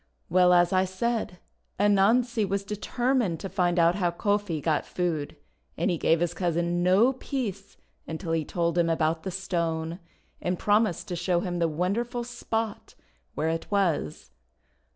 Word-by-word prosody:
Well, 180 0 +5
as 175 0 +4
I 185 0 +4
said, 190 +1 -2 0.4
Anansi 215 +4 +3
was 200 0 -1
determined 215 -1 -1
to 195 - -5
find 180 -1 +1
out 170 0 +5
how 180 -2 0
Kofi 205 -1 -1
got 155 0 0
food, 160 -5 -2 0.4
and 170 +4 +1
he 170 - -2
gave 165 0 +2
his 175 0 0
cousin 175 0 0
no 195 +9 +4
peace 210 -7 -5 0.3
until 165 +1 -4
he 165 -1 +1
told 170 +2 -1
him 170 -1 +2
about 160 0 +1
the 190 - -4
Stone, 170 -3 -2 0.4
and 180 0 -1
promised 210 -3 +1
to 180 - -2
show 175 0 0
him 175 -2 -3
the 170 - +2
wonderful 205 +10 -1
spot 225 -2 -4 0.4
where 160 - 0
it 165 0 -3
was. 170 - -1
180 Hz, 155 wpm, -27 LUFS, 170-205 Hz, 0.4 s, Well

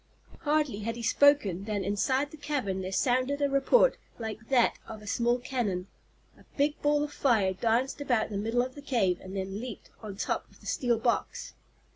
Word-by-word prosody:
Hardly 295 -7 0
had 230 +2 -3
he 235 - -7
spoken 230 -7 +3
than 210 -2 -2
inside 260 +9 0
the - - -9
cavern 275 -11 -2
there 185 0 -4
sounded 255 +7 +1
a 285 - +2
report 275 - +4 0.2
like 220 -1 -6
that 255 -3 +3
of 215 -1 -9
a - - -11
small 240 +3 +1
cannon. 220 -8 -2 0.5
A - - -18
big 290 +1 +1
ball 295 0 +2
of 295 - -5
fire 215 -8 +2
danced 235 +8 0
about 245 -6 +1
the 200 - -2
middle 225 +4 +1
of 255 +1 -6
the 285 - -10
cave 200 -11 +1
and 190 +1 -7
then 195 +1 -3
leaped 240 -2 -8
on 210 -3 -7
top - - -2
of - - -21
the - - -18
steel 240 -3 +1
box. 235 +1 -1
240 Hz, 195 wpm, -29 LUFS, 205-275 Hz, 0.5 s, report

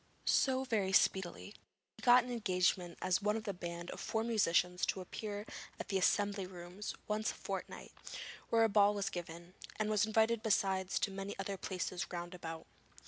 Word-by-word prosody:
So 260 -1 +3
very 205 -7 0
speedily 190 +1 +2 0.4
he - - -14
got 245 0 +7
an 250 - -6
engagement 180 -5 +1
as 185 +1 +2
one 210 +1 +1
of 220 0 -7
a 200 - -1
band 175 -1 -6
of - - -7
four 220 0 -1
musicians 180 -5 +2
to - - 0
appear 205 +3 -5 0.3
at - - -6
the 195 -2 +1
Assembly 200 0 +2
Rooms 180 +2 -7
once 215 +1 0
a - - -4
fortnight, - - -6 0.6
where 230 0 +4
a - - +6
ball 205 -1 +4
was 200 -1 -1
given, 170 0 -7 0.2
and 215 0 -1
was 210 0 +3
invited 220 +1 +3
besides 195 -3 +1
to 200 - 0
many 195 +1 -5
other 195 0 -3
places 185 -1 -3
round 175 0 -5
about. 165 -2 -7
195 Hz, 180 wpm, -35 LUFS, 180-215 Hz, 0.6 s, got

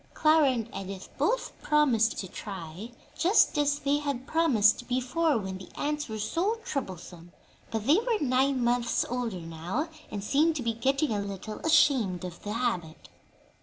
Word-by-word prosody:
Clara 310 -2 +5
and 235 -4 -1
Edith 195 -1 -6
both - - +1
promised 255 -7 +3
to 190 - -4
try 185 +1 -7 0.3
just 365 +3 +4
as 290 0 +2
they 285 0 +1
had 280 -3 -3
promised 245 -9 +3
before, 260 +5 +1
when 190 -3 -5
the 185 - -11
ants 300 -1 -2
were 220 - -4
so 345 - 0
troublesome; 180 - -6 0.4
but 220 -2 -3
they 295 +7 +5
were 470 -1 0
nine 265 -2 +2
months 240 0 +1
older 235 -7 -3
now, 165 - -4 0.2
and 205 -2 -5
seemed 305 +8 +2
to 270 - -3
be 230 0 0
getting 270 +4 0
a 205 -2 0
little 200 +1 -6
ashamed 275 - +3
of 175 -1 -8
the 205 - -5
habit. 220 -10 -3
245 Hz, 165 wpm, -28 LUFS, 200-295 Hz, 0.4 s, Clara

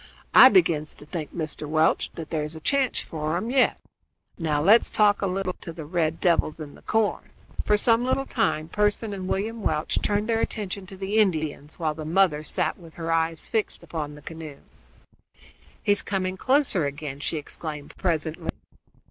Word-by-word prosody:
I - - +11
begins 155 - +2
to 145 - -12
think, 155 -1 -5
Mr. 155 -2 -4
Welch, 155 +1 +2
that 165 -2 -7
there's 155 -1 -2
a - - -7
chance 270 - +1
for 155 +1 -3
'em 225 +6 -3
yet. 265 -1 +3 0.6
Now 155 -4 0
let's 205 +10 +5
talk 205 -1 +3
a 200 - +1
little 185 0 -1
to 170 - -6
these 160 -2 -8
red 160 0 0
devils 165 -3 +2
in 150 -2 -7
the - - -16
corn." 220 -2 0 0.4
For 210 - +4
some 230 +2 +3
little 260 +2 0
time 160 -12 0
Pearson 210 +2 0
and 190 -2 -5
William 220 +4 -2
Welch 155 -5 0
turned 205 +1 0
their 225 -1 +1
attention 200 -3 -4
to 190 -1 -10
the 200 +3 0
Indians, 155 -6 0
while 160 -3 0
the 155 0 -7
mother 160 -2 +2
sat 155 - -1
with 165 -2 -14
her 165 -1 -3
eyes 165 0 0
fixed 220 -2 -2
upon 150 -3 -5
the 150 - -14
canoe. 160 -4 -8 1.2
"He - - +3
is 205 - +3
coming 185 -2 -2
closer 255 - +2
again," 140 -1 -6
she 145 +3 -2
exclaimed 150 0 -7
presently. 160 -3 -2
170 Hz, 180 wpm, -25 LUFS, 155-205 Hz, 1.2 s, I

